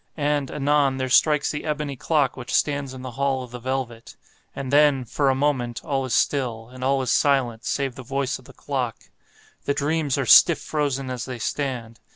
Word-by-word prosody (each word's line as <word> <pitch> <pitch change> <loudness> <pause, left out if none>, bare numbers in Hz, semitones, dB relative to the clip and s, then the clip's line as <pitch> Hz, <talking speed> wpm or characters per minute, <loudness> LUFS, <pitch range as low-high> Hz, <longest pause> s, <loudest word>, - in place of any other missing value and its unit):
And, 145 -2 0
anon, 140 -2 +1
there 130 -1 -2
strikes 150 +3 +3
the 145 - -5
ebony 150 -2 -3
clock 145 0 +1
which 125 -2 -8
stands 140 -2 0
in 130 - -9
the 130 - -6
hall 135 -2 +1
of 125 - -11
the 125 - -7
velvet. 125 -2 -4 0.4
And 135 0 -5
then, 145 -3 +4
for 140 +4 0
a 135 - +2
moment, 130 -4 -1
all 135 -4 -1
is 130 - -1
still, 120 -5 0
and 130 0 -9
all 135 0 +1
is 125 - -1
silent 125 -5 +1
save 135 -2 -1
the 130 - -9
voice 135 +1 -2
of 130 - -18
the - - -13
clock. 130 -5 -3 0.7
The 140 - 0
dreams 150 -1 0
are 135 - 0
stiff 170 +6 +7
frozen 140 -3 -2
as 125 -3 -4
they 130 -2 -6
stand. 120 -1 -4
135 Hz, 200 wpm, -23 LUFS, 125-145 Hz, 0.7 s, stiff